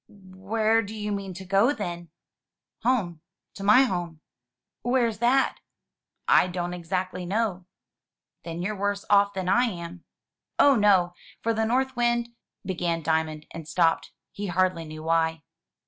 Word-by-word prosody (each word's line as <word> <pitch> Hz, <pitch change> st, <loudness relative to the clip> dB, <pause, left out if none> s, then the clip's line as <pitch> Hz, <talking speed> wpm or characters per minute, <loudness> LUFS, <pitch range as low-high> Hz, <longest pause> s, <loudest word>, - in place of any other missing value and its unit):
"Where 205 Hz, +3 st, -1 dB
do 215 Hz, 0 st, -7 dB
you 210 Hz, -1 st, -3 dB
mean 195 Hz, -2 st, -4 dB
to 190 Hz, +1 st, -8 dB
go, 200 Hz, +8 st, +3 dB
then?" 175 Hz, -, -5 dB, 0.7 s
"Home 195 Hz, -10 st, 0 dB, 0.3 s
to 195 Hz, -, -8 dB
my 210 Hz, +6 st, +7 dB
home." 175 Hz, -9 st, -3 dB, 0.6 s
"Where's 240 Hz, -3 st, +1 dB
that?" 255 Hz, +3 st, +2 dB, 0.7 s
"I -, -, +5 dB
don't 175 Hz, -1 st, -3 dB
exactly 180 Hz, +1 st, -3 dB
know." 190 Hz, -1 st, -2 dB, 0.8 s
"Then 170 Hz, +1 st, -5 dB
you're 210 Hz, +3 st, -2 dB
worse 200 Hz, 0 st, -2 dB
off 200 Hz, 0 st, +5 dB
than 190 Hz, -1 st, -3 dB
I 240 Hz, +6 st, +4 dB
am." 175 Hz, -5 st, -6 dB, 0.5 s
"Oh 280 Hz, -1 st, +6 dB
no, 195 Hz, -5 st, +4 dB, 0.3 s
for 230 Hz, -, +1 dB
North 245 Hz, +4 st, 0 dB
Wind 240 Hz, 0 st, +1 dB
— -, -, -64 dB
" -, -, -40 dB
began 170 Hz, -3 st, -2 dB
Diamond, 160 Hz, -1 st, -1 dB
and 165 Hz, -2 st, -8 dB
stopped, 165 Hz, +1 st, +1 dB, 0.2 s
he 205 Hz, 0 st, -5 dB
hardly 180 Hz, -2 st, 0 dB
knew 155 Hz, 0 st, -9 dB
why. 160 Hz, 0 st, +1 dB
190 Hz, 145 wpm, -26 LUFS, 175-220 Hz, 0.8 s, my